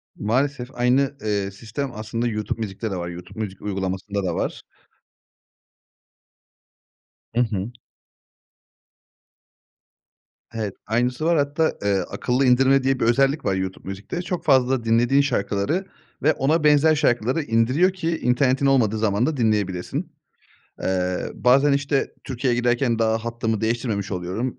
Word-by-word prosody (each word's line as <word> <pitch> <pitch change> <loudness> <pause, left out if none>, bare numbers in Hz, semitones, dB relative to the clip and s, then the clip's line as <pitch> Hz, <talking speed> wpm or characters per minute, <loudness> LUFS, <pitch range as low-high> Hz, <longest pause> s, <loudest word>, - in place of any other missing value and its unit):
Maalesef 125 +3 -1
aynı, 130 +3 +2
eee, 100 -2 -1
sistem 115 +7 -5
aslında 115 +2 -3
YouTube 105 0 -3
Music'te 105 +1 -4
de - - -2
var. 85 -1 -4
YouTube 90 +4 -10
Music 100 -3 -4
uygulamasında 95 0 -3
da 90 -2 -1
var. - - -3 2.7
I - - +2
hı. 110 -1 -2 2.8
Evet. 110 -4 -3
Aynısı 125 +6 0
var. 170 -1 +3
Hatta, 145 +3 +1
eee, 100 -1 +2
akıllı 130 +2 0
indirme 130 +2 +4
diye 135 -1 +1
bir - - +1
özellik 135 +5 +2
var 95 - +1
YouTube 95 0 -4
Music'te. 100 - -5
Çok 180 -1 -4
fazla 130 -3 +3
dinlediğin 120 +5 +3
şarkıları 130 - -1 0.4
ve 155 - +4
ona 155 +4 +1
benzer 150 +1 +5
şarkıları 130 0 +1
indiriyor 130 +10 +2
ki 165 -3 -2
internetin 130 +2 +2
olmadığı 120 -6 +3
zaman 105 +1 +1
da 150 -1 -1
dinleyebilesin. 105 -6 -1 0.7
Eee, 90 -1 0
bazen 135 +4 +4
işte 140 0 0
Türkiye'ye 125 -1 -1
giderken 120 -1 +1
daha 110 0 +2
hattımı 115 -2 -2
değiştirmemiş 110 -3 -1
oluyorum. 95 +9 -3
120 Hz, 130 wpm, -23 LUFS, 105-135 Hz, 2.8 s, benzer